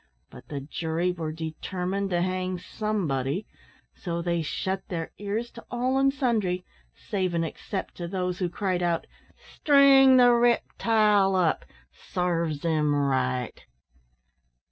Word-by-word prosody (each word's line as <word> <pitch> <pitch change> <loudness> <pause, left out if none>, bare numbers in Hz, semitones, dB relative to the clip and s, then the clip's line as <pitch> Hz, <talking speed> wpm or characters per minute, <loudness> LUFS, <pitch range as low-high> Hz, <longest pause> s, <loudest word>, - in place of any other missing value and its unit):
But - - -13
the 140 -2 -5
jury 165 +4 -2
were 165 -3 -4
determined 180 +5 -3
to 175 -1 +1
hang 185 0 -2
somebody, 175 - -2 0.5
so 170 -2 -4
they 170 -1 0
shut 190 +4 -2
their 165 -3 -4
ears 210 +4 -3
to 230 - -12
all 255 +2 0
and 275 0 +4
sundry, 215 -10 0 0.3
save 185 -4 -2
and 165 0 +1
except 190 +4 -6
to 175 - -4
those 180 0 -2
who 180 -2 0
cried 185 -1 -1
out, 170 -2 0 0.3
"String 275 -2 +5
the 245 -1 +7
riptile 220 -4 +3
up 175 -4 +1 0.3
sarves 170 -4 -2
him 155 -3 +1
right!" 130 -3 -1
180 Hz, 130 wpm, -26 LUFS, 165-215 Hz, 0.5 s, the